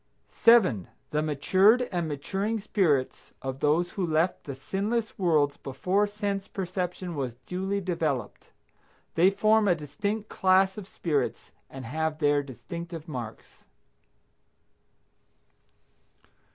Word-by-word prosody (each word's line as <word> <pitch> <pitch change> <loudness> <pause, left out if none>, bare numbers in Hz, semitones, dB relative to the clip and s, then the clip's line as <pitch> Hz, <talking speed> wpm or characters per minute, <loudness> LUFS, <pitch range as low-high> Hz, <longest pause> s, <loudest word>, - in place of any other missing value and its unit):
7. 190 - +4 0.2
The 150 - +1
matured 185 - +4
and 175 -3 -1
maturing 195 +9 -2
spirits 180 -11 0
of 135 0 -4
those 160 +5 +2
who 185 -3 -2
left 160 +3 0
the 140 - -5
sinless 210 - -2
worlds 155 -6 +2
before 185 +10 0
sense 205 -1 -3
perception 180 -1 -4
was 130 -5 -3
duly 190 +2 -2
developed. 155 - -3 0.6
They 175 +3 +5
form 215 +2 +3
a 180 - +4
distinct 200 +8 -3
class 190 0 +3
of 210 -3 -8
spirits 145 -10 -2 0.2
and 135 -2 -8
have 155 +4 -2
their 145 -2 +3
distinctive 165 - -8
marks. 120 -7 -8
175 Hz, 110 wpm, -27 LUFS, 145-195 Hz, 0.6 s, They